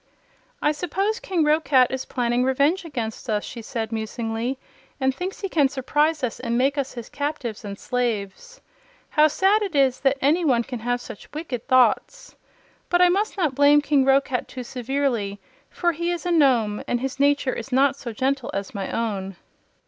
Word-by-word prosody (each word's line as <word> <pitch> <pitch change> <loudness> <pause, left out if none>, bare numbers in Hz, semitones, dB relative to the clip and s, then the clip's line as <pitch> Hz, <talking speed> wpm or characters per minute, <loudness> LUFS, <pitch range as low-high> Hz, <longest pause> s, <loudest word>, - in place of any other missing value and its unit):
"I 300 - +4
suppose 385 +8 -1
King 360 -4 0
Roquat 300 -4 +3
is 265 0 -3
planning 245 -1 0
revenge 280 +8 +2
against 240 -6 -5
us," 210 -1 0
she 235 - -7
said, 225 -1 -4
musingly, 225 +3 -3 0.4
"and 265 -1 +1
thinks 360 +7 -5
he 395 - -1
can 295 -7 +2
surprise 295 +3 0
us 245 - -2
and 235 -2 -1
make 270 +3 +2
us 275 -2 -2
his 235 -3 -7
captives 285 -7 -4
and 200 -1 -6
slaves. 245 - -3 0.5
How 305 0 +5
sad 385 +7 +2
it 390 -6 -3
is 270 -2 +3
that 270 0 +2
any 310 +7 +2
one 250 -6 +3
can 245 0 -6
have 245 +2 -1
such 205 - -11
wicked 290 -7 -5
thoughts! 260 - +2 0.5
But 350 - +3
I 360 0 +6
must 405 +4 0
not 315 -8 +1
blame 285 +2 +5
King 290 -2 +2
Roquat 270 -1 +2
too 255 - -7
severely, 245 -5 -2 0.3
for 345 -1 0
he 340 +2 -3
is 350 0 -3
a 355 - 0
Nome, 245 -10 +3
and 245 - 0
his 270 +2 -4
nature 285 -2 +2
is 235 +3 -7
not 270 +1 +3
so 250 -4 -7
gentle 265 +3 -1
as 195 0 -4
my 195 -2 -4
own." 195 -4 -3
265 Hz, 185 wpm, -23 LUFS, 235-300 Hz, 0.5 s, I